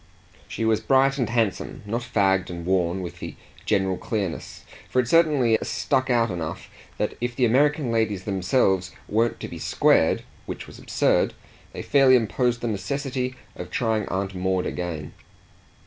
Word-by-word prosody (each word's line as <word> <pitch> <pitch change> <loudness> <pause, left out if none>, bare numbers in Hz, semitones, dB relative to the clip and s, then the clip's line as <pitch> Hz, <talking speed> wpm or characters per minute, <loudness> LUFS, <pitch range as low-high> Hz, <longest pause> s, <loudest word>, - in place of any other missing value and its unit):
She 115 - -3
was 110 -1 +3
bright 135 +1 +3
and 125 - 0
handsome, 110 -5 -1
not 115 +4 -2
fagged 95 -5 +1
and 85 -1 -6
worn, 90 0 +1
with 85 - -7
the - - -7 0.3
general 95 -3 +1
clearness; 100 -7 -4 0.2
for 130 - +1
it 125 - +1
certainly 145 -7 +4
stuck 130 -2 0
out 115 -3 +2
enough 80 -3 -5 0.3
that - - -1
if 120 0 -2
the 125 - +3
American 140 +2 +2
ladies 110 -4 0
themselves 95 -1 +1
weren't 115 +3 +1
to - - -4
be - - -8
squared, - - +3 0.2
which - - -6
was - - -13
absurd, - - +1 0.4
they - - -6
fairly 135 -2 +5
imposed 120 +1 +1
the 120 - -2
necessity 130 +4 -2 0.2
of 90 0 -7
trying 110 0 0
Aunt 95 0 -2
Maud 95 0 0
again. 80 -4 -4
110 Hz, 160 wpm, -24 LUFS, 95-125 Hz, 0.4 s, fairly